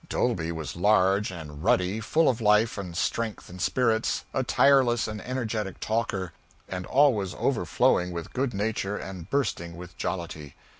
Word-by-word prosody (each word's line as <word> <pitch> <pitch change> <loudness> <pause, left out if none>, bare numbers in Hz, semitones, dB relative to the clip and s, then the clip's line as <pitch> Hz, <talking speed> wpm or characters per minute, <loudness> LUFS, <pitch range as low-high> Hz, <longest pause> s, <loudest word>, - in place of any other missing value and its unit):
Dolby 80 +1 0
was 80 -2 -5
large 100 +2 +3
and 80 -4 -8
ruddy, 95 +3 +2
full 160 +9 +2
of 120 -2 +1
life 105 +1 +4
and 90 -4 -6
strength 115 -2 -2
and 90 0 -8
spirits, 115 -1 +1
a 130 - +1
tireless 130 -3 +4
and 110 -1 -5
energetic 110 -6 -3
talker, 105 -5 -2 0.3
and 90 -1 -5
always 125 -9 +3
overflowing 90 0 +1
with 85 -1 -6
good 130 0 0
nature 105 -1 -1
and 95 -2 -8
bursting 85 -11 -1
with 90 -1 -10
jollity. 85 -5 -4
100 Hz, 150 wpm, -27 LUFS, 90-115 Hz, 0.3 s, life